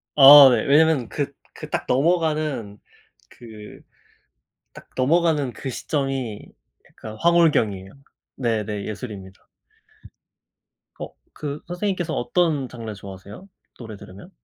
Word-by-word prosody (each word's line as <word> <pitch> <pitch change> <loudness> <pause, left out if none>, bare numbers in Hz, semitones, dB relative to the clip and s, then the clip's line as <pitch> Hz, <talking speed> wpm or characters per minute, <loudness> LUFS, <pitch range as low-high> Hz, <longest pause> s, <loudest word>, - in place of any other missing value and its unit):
아 140 -1 +10
네. 115 -3 0
왜냐면 150 -3 +3
그 145 -1 -4 0.2
그 - - -10
딱 - - -3
넘어가는 150 - -1 0.5
그 110 -3 -13 0.9
딱 - - -14
넘어가는 150 0 +1
그 135 - -7
시점이 135 -5 -4 0.5
약간 110 0 -11
황홀경이에요. 145 - +2 0.4
네네 105 -4 -3
예술입니다. 100 -4 -9 1.5
어 - - -8 0.2
그 145 0 -6
선생님께서 175 -2 -3
어떤 150 0 0
장르 115 -3 -8
좋아하세요? 100 - -12 0.3
노래 110 -3 -9
들으면? 95 +1 -14
130 Hz, 240 characters per minute, -22 LUFS, 110-155 Hz, 1.5 s, 아